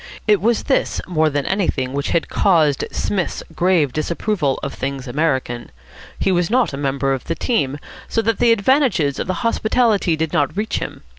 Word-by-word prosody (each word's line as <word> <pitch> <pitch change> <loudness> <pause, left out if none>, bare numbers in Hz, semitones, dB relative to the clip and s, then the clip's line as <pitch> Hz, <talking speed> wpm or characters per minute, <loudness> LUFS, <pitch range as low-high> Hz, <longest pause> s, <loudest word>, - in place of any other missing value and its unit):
It 210 -2 +4
was 230 +2 +1
this 270 - 0
more 160 -3 +1
than 145 -2 -2
anything 150 -10 -1
which 140 0 -2
had 170 - 0
caused 155 -8 +2
Psmith's 190 -4 -2
grave 170 -7 +2
disapproval 160 -2 -1
of 140 - -3
things 135 0 -4
American. 130 -4 -1 0.5
He 195 - +1
was 175 -2 +1
not 245 - +2
a - - -2
member 135 -1 0
of 130 - -4
the 165 - -2
team, 145 - 0 0.3
so 225 - 0
that 225 0 0
the 240 -1 +4
advantages 205 - +2
of - - -3
the 185 - -1
hospitality 220 -6 +2
did 160 -1 -2
not 145 +5 0
reach 215 +1 -1
him. - - -7
165 Hz, 180 wpm, -20 LUFS, 140-210 Hz, 0.5 s, It